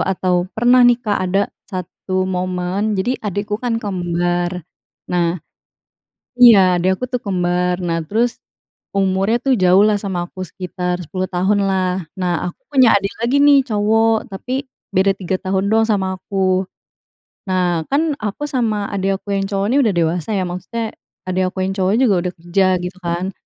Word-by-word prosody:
atau 185 -1 0
pernah 245 +2 +5
nih, 245 -1 +6
Kak, 215 -4 -1
ada 195 +2 +2 0.3
1 185 0 -3
momen. 185 +3 -2
Jadi 245 +7 -1
adikku 205 0 -3
kan 240 -2 -1
kembar. 175 -2 -2 0.5
Nah 175 -1 +1 1.0
iya, 200 -7 +7
adik 185 +2 0
aku - - -1
tuh 250 - -1
kembar. 180 -2 -1
Nah, 170 -1 -1
terus, 230 +7 0 0.6
umurnya 195 +3 +1
tuh 270 -1 +3
jauh 185 +1 +5
lah 210 -1 +3
sama 190 -4 -3
aku, 185 - -7
sekitar 180 +1 -4
10 185 +3 -3
tahun, 195 +3 +1
lah. 185 -2 -1
Nah, 180 -2 -1
aku - - -46
punya 260 -5 +5
adik 200 0 +1
lagi 275 +4 +3
nih, 285 -2 +5
cowok, 225 +1 +1
tapi 255 +8 -4 0.3
beda 190 +1 +4
3 190 0 -3
tahun 190 +1 0
doang 225 - +4
sama 190 -3 0
aku. 185 -1 0 0.9
Nah, 180 -3 +1
kan, 305 +2 +2
aku 215 +7 -3
sama 220 -7 -1
adik 195 0 0
aku 200 - -4
yang 195 - 0
cowok 195 -1 -1
ini - - +3
udah 220 - +2
dewasa, 170 +3 0
ya. 190 - 0
Maksudnya, 220 +6 -5 0.3
adik 185 0 0
aku 190 -1 -2
yang 195 - -2
cowok 190 0 +1
juga 240 -7 +4
udah 180 - -4
kerja, 175 +3 +1 0.2
gitu 180 +1 -6
kan. 175 +2 -2
190 Hz, 165 wpm, -18 LUFS, 180-215 Hz, 1.0 s, iya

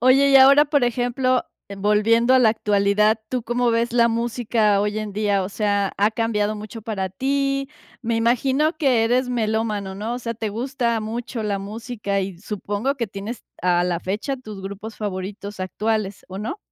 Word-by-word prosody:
Oye, 260 +3 +5
y 275 - +8
ahora, 275 +2 +8
por 285 -3 +2
ejemplo, 245 +1 +1 0.3
volviendo 210 +4 +3
a 260 - +6
la 235 -4 +5
actualidad, 210 0 +2
¿tú 255 -2 -2
cómo 240 +1 +1
ves 230 +1 0
la 235 -1 +4
música 230 -3 +1
hoy 210 +1 -1
en 210 -2 -5
día? 205 -1 +1
O 185 - -3
sea, 205 -1 0
ha 205 +2 +4
cambiado 215 -2 0
mucho 215 +1 -8
para 200 -4 -3
ti. 275 +6 -1 0.3
Me 235 -1 -1
imagino 260 +7 +2
que 255 -6 +3
eres 250 +3 +2
melómano, 215 -4 -1
¿no? 220 +4 -3
O 245 - -4
sea, 230 -1 -4
te 220 -1 -3
gusta 235 0 -1
mucho 225 +2 -4
la 205 -2 -1
música 205 0 -3
y 190 -2 -5
supongo 205 +6 -2
que 235 -6 -3
tienes 200 +5 -6 0.2
a 175 -1 +2
la 175 -1 0
fecha 205 - -3
tus 215 -6 -9
grupos 200 +3 -7
favoritos 200 0 -5
actuales, 205 +1 -2
¿o 190 0 -7
no? 230 - -4
220 Hz, 180 wpm, -22 LUFS, 205-245 Hz, 0.3 s, y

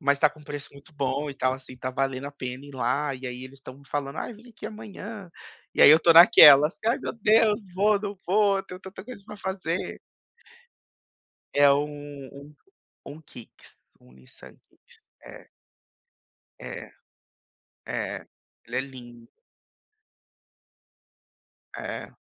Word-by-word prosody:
mas 140 -1 +2
tá 150 - +5
com 150 - -18
um - - -15
preço 145 -1 -7
muito 140 +2 -17
bom 140 +1 -2
e 140 - -6
tal 130 -1 0
assim, 130 -1 -9
está 130 +1 -5
valendo 135 +1 -2
a - - -6
pena 130 0 -7
ir 145 - -12
lá 135 +3 -1
e 130 0 -8
aí 125 +1 -6
eles 135 +1 -12
estão 130 -1 -11
me 140 - -19
falando: 140 0 -4
"Ai, - - -5
vem 230 +3 -16
aqui 230 - -14
amanhã.". 210 -2 -9 0.4
E - - +4
aí - - +10
eu 155 - +9
estou 165 +1 +4
naquelas: 150 -2 +9
"Ai, 235 +4 +2
meu - - -5
Deus, 220 0 +3
vou, 205 +1 +2
não 200 -1 -6
vou, 200 0 +2
tenho 180 +1 -11
tanta 190 0 -11
coisa 250 -4 -10
pra - - -9
fazer.". 190 -3 -4 1.6
É, 145 0 +6
hum, 145 -1 -4
um 140 +2 -13 0.6
um 155 +2 -12
Kicks, 120 -6 -16 0.2
um 65 - -21
Nissan 65 0 -17
Kicks, - - -26 0.2
é. - - -13 1.1
É. - - -8 1.0
É, - - -4 0.4
ele 120 - -7
é - - +1
lindo. 120 -3 -12 2.5
É. - - -6
145 Hz, 155 wpm, -26 LUFS, 135-190 Hz, 2.5 s, aí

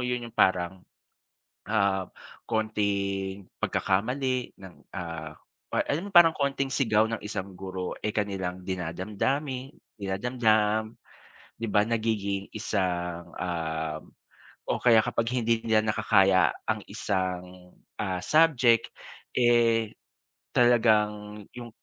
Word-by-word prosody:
'yon, 125 -1 -2
'yong 115 - -18
parang, 95 0 +2 0.8
ah, 100 -3 0 0.3
konting 100 -3 -1
pagkakamali 125 +6 0
ng, 95 -2 -12 0.2
ah 85 -4 -6 0.4
or - - 0
alam 160 +6 0
mo - - -6
'yong - - -29
parang 165 -2 +5
konting 140 -1 0
sigaw 110 -5 +2
ng 115 -1 -4
isang 100 -2 -5
guro, 95 -1 -5
eh, 105 - 0
kanilang 95 -4 -3
dinadamdami 110 - -2 0.2
dinadamdam, 110 +1 0 0.6
'di 115 - -4
ba? 105 +1 +3
Nagiging 105 -4 -1
isang, 90 -5 -2
uhm, 80 -3 -3 0.7
o - - 0
kaya 115 -3 +7
kapag 115 +2 -1
hindi 115 -1 +1
nila 110 -1 +3
nakakaya 95 -3 +4 0.2
ang - - -1
isang, 90 -1 -3 0.3
ah, 95 -1 -1
subject, 130 -8 +4 0.4
eh, 115 -2 +3 0.6
talagang 105 -3 +3
'yong 120 -1 -7
105 Hz, 110 wpm, -27 LUFS, 95-115 Hz, 0.8 s, kaya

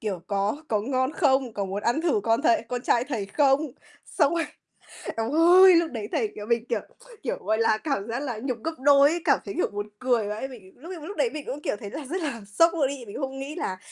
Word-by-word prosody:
kiểu: 200 -5 -3
"Có 200 +5 0
có 215 -2 +1
ngon 260 +4 0
không? 265 -4 +2
Có 200 - -2
muốn 195 +2 -4
ăn 240 +7 +1
thử 320 -11 +2
con 230 +3 +2
thầy 340 0 +3
con 245 -1 -3
trai 240 -1 +2
thầy 235 -8 -3
không?" 280 +6 +2 0.5
Xong 300 +1 +4
rồi 335 - 0 0.7
eo 225 +3 -1
ơi! 355 +3 +7
Lúc 335 -1 +2
đấy 220 -4 -5
thầy, 430 - 0
kiểu 205 - -7
mình, 235 +1 0
kiểu - - +1 0.4
kiểu, 255 - -2
gọi 215 +2 +1
là, 225 -1 +3
cảm 230 -6 -3
giác 235 +2 -3
là 255 -6 -4
nhục 255 -3 -2
gấp 325 - -1
đôi 280 +1 +6
ấy, 340 0 -2
cảm - - +4
thấy, 200 - -5
kiểu, - - +2
buồn 205 +1 -5
cười 245 -5 +1
vãi. 210 +5 -4
Mình 215 -8 -13
lúc 330 +8 -10
ấy 355 - -6
mà 300 - -10
lúc 405 - -7
đấy - - +2
mình 305 -8 -7
cũng, 275 +4 -5
kiểu, - - -1
thấy 205 - -7
là 295 0 -6
rất 355 +7 -3
là 275 -7 -3 0.2
sốc 330 +1 +6
luôn 295 -6 +1
ấy. 275 -3 -6
Mình 200 - -9
cũng - - -4
không 270 0 -8
nghĩ 280 +3 -6
là 190 - -3
265 Hz, 265 wpm, -26 LUFS, 220-305 Hz, 0.7 s, ơi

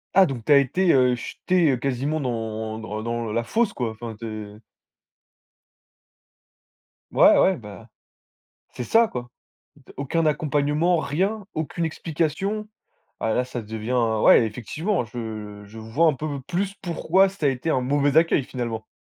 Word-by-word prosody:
Ah, 195 0 +8
donc 130 -7 -5
tu 150 - -1
as 145 - +9
été, 170 +7 +3
heu, 125 -2 +4
jetée 160 +3 +1
quasiment 140 +4 -1
dans 110 -4 -3
dans 110 0 -5
dans 115 -1 -3
la 115 +2 0
fosse, 220 - 0
quoi, 120 -3 -2
enfin, 110 0 -8
tu 115 - -6
es 105 -1 -7 2.5
Ouais, - - +6
ouais, 190 -1 +4
bah, 110 0 -11 0.8
c'est - - -6
ça, 230 - +4
quoi, 120 -6 -6 0.5
d 140 - -17
aucun 150 +4 0
accompagnement, 150 +2 +1
rien, 190 +9 -1
aucune 160 +2 -3
explication. 165 +6 -2 0.5
Ah 110 - 0
là, 125 - +1
ça 125 -1 -5
devient 110 +2 -5 0.3
ouais, 115 - +7
effectivement, 135 - -2
je 110 -3 -7
je 110 +2 -12
vois 115 +9 +1
un 155 - +2
peu 145 0 -4
plus 185 +6 -2
pourquoi 185 +2 +2
ça 190 -4 -6
a - - +4
été 130 +4 -4
un 130 -4 +1
mauvais 140 +2 +1
accueil, 160 -4 +4
finalement. 115 -4 -5
135 Hz, 155 wpm, -24 LUFS, 115-165 Hz, 2.5 s, as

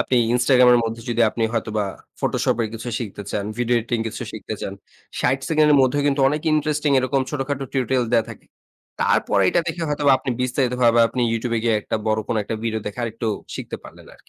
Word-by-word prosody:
আপনি 130 - +1 0.2
Instagram 125 0 +5
এর 120 - +6
মধ্যে 115 +1 -4
যদি 120 0 +2
আপনি 115 - -3
হয়তোবা 110 -2 -1 0.4
Photoshop - - 0
এর 110 - -2
কিছু 115 +2 -6
শিখতে 105 -3 -6
চান, 100 -1 -2
ভিডিও 120 0 +2
এডিটিং 115 +1 -2
কিছু - - -6
শিখতে - - -6
চান, - - -4 0.5
৬০ 130 +2 +2
সেকেন্ডের 150 -2 +4
মধ্যেও 135 +2 +2
কিন্তু 140 0 +1
অনেক 150 +1 -2
ইন্টারেস্টিং 150 -1 +1
এরকম 130 +1 0
ছোটখাটো 140 -1 -3
টিউটোরিয়াল 130 -2 +1
দেয়া 115 -2 +4
থাকে। - - -12 0.6
তারপরে 100 - +2
এইটা 175 - +3
দেখে 165 +1 -4
হয়তোবা 145 -2 +3
আপনি 130 - -4
বিস্তারিত 125 0 0
ভাবে 120 0 +5
আপনি 125 +3 -3
YouTube 115 +1 -1
এ - - -2
গিয়ে 115 -2 +3
একটা - - -2
বড় 110 0 +1
কোনো 110 - 0
একটা 110 - -3
ভিডিও 110 -1 -1
দেখে 105 +3 -5
আরেকটু 115 0 -4 0.3
শিখতে - - -6
পারলেন - - -13
আরকি। - - -27
125 Hz, 205 wpm, -22 LUFS, 115-140 Hz, 0.6 s, এর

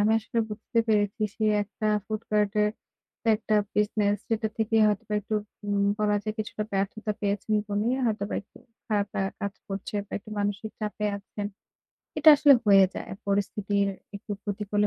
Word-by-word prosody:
আমি 210 +2 +4
আসলে 225 +1 -3
বুঝতে 225 +2 -3
পেরেছি 205 0 +2
সে 220 - 0 0.2
একটা 210 +1 -5 0.2
ফুড 215 -1 -3
কার্টের 210 0 +2 0.7
একটা 215 0 -1 0.2
বিজনেস 210 -1 +2
যেটা 220 -1 +1
থেকে 225 0 +1
হয়তো 210 -2 +1 0.2
একটু 215 - -4 0.3
উম 205 -1 +1
বলা 210 -1 +2
যায় 215 0 -3
কিছুটা 215 0 -3
ব্যর্থতা 200 +2 -1
পেয়েছেন 205 +1 -1 0.2
বলেই 210 +4 +1
হয়তোবা 210 -3 -1
একটু 205 - -27 0.3
খারাপ 205 -2 +1
লাগা 195 0 0
কাজ 200 0 -3
করছে 195 +1 -5
বা - - -18
একটু 210 - -14
মানসিক 205 +1 -2
চাপে 210 0 -2
আছেন। 205 +1 -6 0.7
এটা 305 +1 +6
আসলে 290 0 +7
হয়ে 195 -1 +8
যায়। - - -6 0.2
পরিস্থিতির 200 0 +1 0.3
একটু 200 - -13
প্রতিকূলে 205 0 0
210 Hz, 155 wpm, -27 LUFS, 200-215 Hz, 0.7 s, হয়ে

